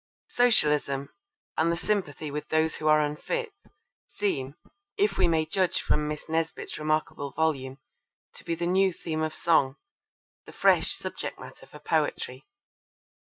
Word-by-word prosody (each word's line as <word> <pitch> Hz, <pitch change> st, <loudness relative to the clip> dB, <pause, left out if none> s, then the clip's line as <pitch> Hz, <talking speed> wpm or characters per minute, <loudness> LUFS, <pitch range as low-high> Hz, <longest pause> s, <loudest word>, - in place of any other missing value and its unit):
Socialism, 150 Hz, -, +3 dB, 0.5 s
and 165 Hz, +1 st, +3 dB
the 170 Hz, -, -1 dB
sympathy 160 Hz, -7 st, -2 dB
with 150 Hz, +1 st, -4 dB
those 160 Hz, 0 st, +1 dB
who 155 Hz, -, -2 dB
are 155 Hz, 0 st, +6 dB
unfit, 460 Hz, -, -3 dB, 0.6 s
seem, 140 Hz, -9 st, -2 dB, 0.4 s
if 410 Hz, +1 st, +2 dB
we -, -, +4 dB
may 160 Hz, -2 st, +2 dB
judge 185 Hz, +3 st, +1 dB
from 150 Hz, 0 st, 0 dB
Miss 150 Hz, 0 st, -5 dB
Nesbit's 160 Hz, 0 st, -2 dB
remarkable 155 Hz, -2 st, -1 dB
volume, 135 Hz, -4 st, 0 dB, 0.6 s
to -, -, -10 dB
be 165 Hz, -, -2 dB
the 170 Hz, -, -2 dB
new 190 Hz, +2 st, +3 dB
theme 160 Hz, -2 st, -4 dB
of 155 Hz, 0 st, -2 dB
song, 150 Hz, -6 st, +3 dB, 0.7 s
the -, -, -11 dB
fresh -, -, +4 dB
subject -, -, -4 dB
matter -, -, -12 dB
for -, -, -12 dB
poetry. -, -, -1 dB
155 Hz, 145 wpm, -27 LUFS, 150-175 Hz, 0.7 s, are